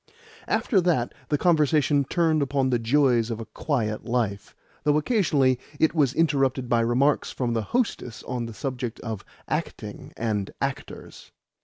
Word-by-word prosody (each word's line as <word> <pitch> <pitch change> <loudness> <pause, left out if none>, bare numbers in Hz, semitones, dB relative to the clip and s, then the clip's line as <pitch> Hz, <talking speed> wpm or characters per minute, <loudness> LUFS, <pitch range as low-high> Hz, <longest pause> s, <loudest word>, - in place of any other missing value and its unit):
After 200 -7 +2
that 160 -9 +1 0.2
the 150 - +2
conversation 150 -3 +3
turned 160 0 +2
upon 135 -1 +1
the 120 - +2
joys 120 -1 +3
of 115 -1 -3
a 115 - -6
quiet 110 -8 -2
life 115 -5 -2 0.3
though 150 0 +3
occasionally 150 - +2 0.2
it 160 - +3
was 145 -5 +2
interrupted 135 -5 +1
by 120 -1 +2
remarks 125 +5 +2
from 120 -2 -2
the 115 - 0
hostess 210 - -1
on 120 -2 -3
the 115 - -8
subject 125 0 -4
of 110 -4 -5 0.2
acting - - -4
and 105 -4 -1
actors. - - -5
130 Hz, 150 wpm, -25 LUFS, 115-150 Hz, 0.3 s, conversation